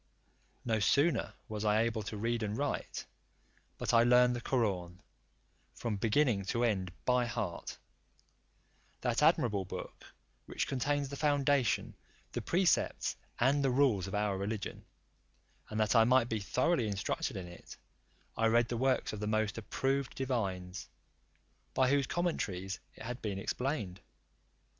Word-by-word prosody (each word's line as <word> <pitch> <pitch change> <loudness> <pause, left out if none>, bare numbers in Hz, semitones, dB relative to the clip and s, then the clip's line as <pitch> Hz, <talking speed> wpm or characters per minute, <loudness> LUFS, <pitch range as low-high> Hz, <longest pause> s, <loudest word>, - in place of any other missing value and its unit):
No 110 -2 +1
sooner 140 - +2
was 110 -2 -4
I 105 +1 +3
able 115 -1 -1
to 105 +1 -5
read 115 +2 -1
and 105 0 -2
write, 145 0 -3 0.7
but - - -1
I 115 - +7
learned 125 +1 +5
the 120 - -4
Koraun 95 -9 -1 0.8
from 110 -3 -2
beginning 115 0 +2
to 115 +5 0
end 95 -6 0
by 125 -1 +3
heart, 100 -6 -4 1.2
that 120 0 0
admirable 120 - +3
book, 90 - -8 0.4
which - - -1
contains 140 +1 -1
the 140 - -6
foundation, 145 -4 +2 0.4
the - - -3
precepts, 180 +1 +1 0.2
and 140 +4 +3
the 135 - +3
rules 125 -8 +2
of 95 - -4
our 105 -2 0
religion; 100 +1 -4 0.8
and 110 - -3
that 110 +1 +2
I 115 - +8
might 120 0 +4
be 110 - -1
thoroughly 120 - +1
instructed 100 -1 -2
in 95 - -5
it, 85 0 -11 0.6
I 115 - +2
read 115 +1 +3
the 120 - -2
works 130 -1 +1
of 105 - -5
the 105 - -3
most 110 +1 0
approved 135 +5 -1
divines, 95 -8 -3 0.9
by 130 0 +3
whose 140 -2 +2
commentaries 95 - -2 0.2
it - - -10
had 125 +2 -5
been 100 -3 -3
explained. 100 - -3
115 Hz, 145 wpm, -33 LUFS, 105-130 Hz, 1.2 s, I